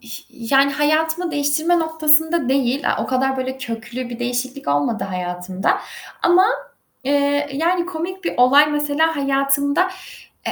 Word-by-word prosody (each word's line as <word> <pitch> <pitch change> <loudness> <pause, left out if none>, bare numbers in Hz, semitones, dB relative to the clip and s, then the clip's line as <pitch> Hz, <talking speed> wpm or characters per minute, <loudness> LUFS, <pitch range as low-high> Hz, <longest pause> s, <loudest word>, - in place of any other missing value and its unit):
ih 235 -1 -9 0.4
yani 275 +1 +4
hayatımı 320 +4 0
değiştirme 305 +4 +1
noktasında 320 -2 +2
değil. 270 0 +1
A, - - -1
o - - -6
kadar 265 +1 0
böyle 260 0 -4
köklü 240 0 -6
bir 240 -1 -7
değişiklik 250 +3 -3
olmadı 145 +10 0
hayatımda 180 +1 -2 0.4
ama, 350 +2 +5 0.6
eee, 285 +1 +1
yani 340 +5 0
komik 365 +1 -6
bir - - -2
olay 280 +4 +5
mesela 295 +2 0
hayatımda, 280 +5 +1 0.6
e - - -1
280 Hz, 135 wpm, -20 LUFS, 255-320 Hz, 0.6 s, ama